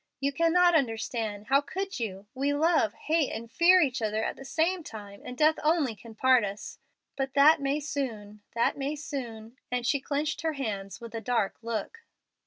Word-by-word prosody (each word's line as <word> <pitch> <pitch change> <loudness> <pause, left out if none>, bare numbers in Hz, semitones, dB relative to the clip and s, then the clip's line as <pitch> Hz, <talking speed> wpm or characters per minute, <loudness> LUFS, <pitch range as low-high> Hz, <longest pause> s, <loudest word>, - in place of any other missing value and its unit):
"You 275 +1 0
cannot 345 +3 +4
understand. 225 -6 -1
How 275 +1 +5
could 385 +2 -4
you? 200 -4 -4
We 275 +2 0
love, 305 -8 +2
hate, 310 +1 0
and 230 +1 -6
fear 360 +5 +6
each 260 -6 0
other 215 0 0
at - - -2
the - - -11
same 330 +6 0
time, 205 -5 -10
and 250 - -8
death 310 +1 +4
only 305 -7 +2
can 225 +2 -13
part 255 -1 +4
us. 200 0 -6 0.4
But 270 -1 -3
that 285 +2 +6
may 275 +2 0
soon 225 -8 -5
that 235 - +2
may 280 +2 -2
soon;" 240 -6 -7
and 250 -1 -1
she 280 +2 +2
clenched 295 +3 -2
her 320 -1 -1
hands 215 -5 -4
with 235 -1 -9
a 225 - -4
dark 225 -3 0
look. 230 - -4
265 Hz, 190 wpm, -28 LUFS, 225-305 Hz, 0.4 s, fear